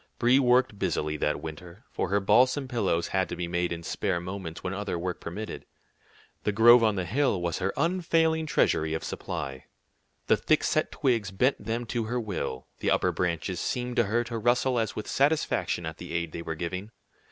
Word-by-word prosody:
Brie 125 +3 +4
worked 125 -4 +3
busily 75 -4 -1
that 75 0 -1
winter, 85 +6 -9
for 90 - -2
her 100 +2 +2
balsam 130 +7 +3
pillows 100 -9 0
had 95 -1 0
to - - -4
be 90 0 -3
made 85 0 -1
in 85 0 -4
spare 90 +1 -1
moments 90 -2 -6
when 95 0 -2
other 100 -2 -3
work 90 +1 -4
permitted. 105 +6 -6 0.8
The 105 - +1
grove 115 +3 +7
on 110 -2 +3
the 95 -2 -2
hill 125 0 +1
was 85 -1 -2
her 95 +1 0
unfailing 165 -2 +1
treasury 80 - +2
of 80 - -4
supply. 65 -1 -5 0.6
The - - +4
thick - - +2
set - - +1
twigs 115 -7 0
bent 115 +6 +1
them 115 +3 -2
to 115 0 -2
her 125 +3 -1
will; 90 - -4
the - - 0
upper - - +2
branches 90 0 -2
seemed 125 -1 -2
to 120 - +4
her 115 +4 +1
to 115 -1 -4
rustle 120 +2 +2
as 110 - -2
with 105 - -5
satisfaction 140 - +1
at 80 0 -5
the 90 -1 -8
aid 85 -1 -1
they 85 - -6
were 80 -1 -4
giving. 90 +5 -4
100 Hz, 200 wpm, -28 LUFS, 85-120 Hz, 0.8 s, grove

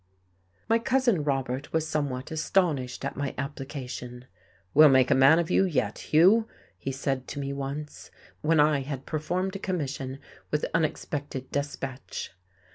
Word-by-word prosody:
My 230 +1 +3
Cousin 240 - +2
Robert 135 -2 -2
was 160 -1 0
somewhat 140 -4 -2
astonished 155 -5 0
at - - -3
my 140 0 -3
application. 130 -3 -6 0.5
"We'll 155 +1 +8
make 130 -2 +4
a - - +8
man 135 +4 +6
of 170 -1 0
you - - +4
yet, 125 - -1
Hugh," 195 +9 +6 0.3
he 135 - -3
said 135 -1 -2
to 145 - -5
me 140 0 -3
once, 140 +2 -6 0.3
when 160 0 +3
I 150 -1 +4
had 135 -1 -5
performed 180 +5 -2
a - - -4
commission 140 -8 -3 0.3
with 150 - 0
unexpected 145 -4 -2
despatch.... 140 -2 -4
145 Hz, 145 wpm, -27 LUFS, 135-160 Hz, 0.5 s, We'll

